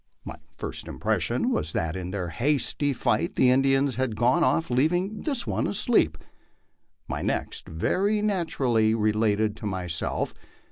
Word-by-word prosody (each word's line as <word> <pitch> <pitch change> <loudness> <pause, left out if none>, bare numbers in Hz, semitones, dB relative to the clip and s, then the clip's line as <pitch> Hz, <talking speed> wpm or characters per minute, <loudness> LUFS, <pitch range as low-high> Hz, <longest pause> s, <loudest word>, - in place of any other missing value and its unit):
My - - -7 0.2
first - - -4
impression - - 0
was 75 +1 -1
that 80 -1 -1
in 90 -1 -4
their 90 -3 -3
hasty 145 - 0
flight 110 -4 0
the 125 - +4
Indians 135 0 +2
had 130 -4 -1
gone 125 +9 +3
oft' 165 -5 +1
leaving 175 - +1
this 275 -6 -1
one - - -1
asleep. 190 - +2 0.9
My - - -3
next, - - -3
very 195 - +1
naturally, 130 - +1
related 110 -1 +1
to 105 - -5
myself. 90 -5 -2
125 Hz, 140 wpm, -26 LUFS, 105-160 Hz, 0.9 s, the